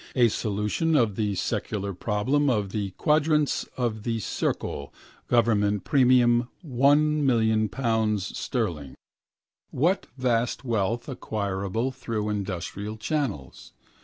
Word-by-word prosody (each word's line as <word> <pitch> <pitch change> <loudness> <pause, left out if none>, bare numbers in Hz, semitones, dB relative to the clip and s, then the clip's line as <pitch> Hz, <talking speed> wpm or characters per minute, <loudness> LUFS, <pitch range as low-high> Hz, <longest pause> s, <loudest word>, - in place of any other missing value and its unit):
A 120 -3 +5
solution 105 +11 0
of 115 -8 +3
the 105 -2 -1
secular 100 +1 -2
problem 120 +10 0
of 105 -6 0
the 100 -2 -2
quadrature 150 -1 +2
of 115 -4 -1
the 115 +1 -2
circle, 70 -7 -3 0.4
government 105 -4 +2
premium 125 -2 +4 0.2
£ - - -11
1,000,000 120 -6 +2
sterling. 90 - -3 0.8
Was 175 +9 +2 0.2
vast 120 -1 0
wealth 115 0 -1
acquirable 105 -2 -2
through 115 -5 -3
industrial 100 +1 -4
channels? 110 - -3
115 Hz, 105 wpm, -26 LUFS, 105-130 Hz, 0.8 s, A